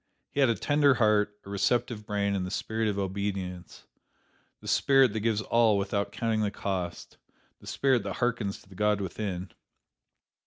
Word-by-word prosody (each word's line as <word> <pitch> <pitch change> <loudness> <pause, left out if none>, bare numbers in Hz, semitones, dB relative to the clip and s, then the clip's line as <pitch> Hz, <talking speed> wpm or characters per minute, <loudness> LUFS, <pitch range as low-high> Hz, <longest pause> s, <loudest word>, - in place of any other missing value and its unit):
He - - -3
had 135 -3 +5
a 115 - +2
tender 145 +5 +3
heart, 105 -2 +2
a 100 - -9
receptive 105 +2 0
brain 100 -1 0
and 95 -2 -1
the 90 - -4
spirit 110 +3 -2
of 105 -2 -1
obedience, 95 -2 -4 0.8
the - - -12
spirit 135 -5 +4
that 110 - -1
gives 110 0 0
all 115 -3 +3
without 100 +1 -1
counting 110 -2 -1
the 105 - +1
cost, 95 -3 -4 0.4
the - - -15
spirit 130 -3 +2
that 100 -2 -5
harkens 120 -5 -1
to - - -23
the - - -13
God 105 +1 +1
within. 95 -1 -4
105 Hz, 170 wpm, -28 LUFS, 100-115 Hz, 0.8 s, had